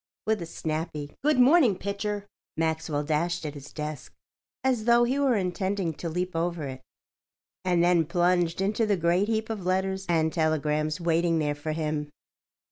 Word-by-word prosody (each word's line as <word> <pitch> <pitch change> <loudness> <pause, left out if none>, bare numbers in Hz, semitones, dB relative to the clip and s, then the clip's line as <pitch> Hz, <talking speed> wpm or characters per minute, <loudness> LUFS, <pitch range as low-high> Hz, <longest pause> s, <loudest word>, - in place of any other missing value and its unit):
With 220 -3 +1
a 170 - -5
snappy 155 -2 -4
"Good 300 -1 +3
morning, 255 - +6
Pitcher," 200 +1 -3 0.3
Maxwell 160 -2 -1
dashed 165 +3 -1
at 150 - -4
his 145 -1 -10
desk 150 -2 -6 0.5
as 250 -5 +1
though 235 0 +5
he 255 +4 +1
were 270 -4 +3
intending 190 -2 -1
to 165 +3 -5
leap 180 +2 -3
over 170 -1 -1
it, 130 -2 -6 0.8
and 175 -2 +2
then 175 -3 +3
plunged 175 0 +1
into 210 +3 +1
the 205 -2 +2
great 175 +4 +2
heap 220 0 -1
of 210 -4 -4
letters 190 +1 -1
and 160 -2 +2
telegrams 155 -1 0
waiting 170 0 +2
there 150 -2 0
for 145 +2 -4
him. 150 -2 -2
175 Hz, 165 wpm, -27 LUFS, 155-200 Hz, 0.8 s, morning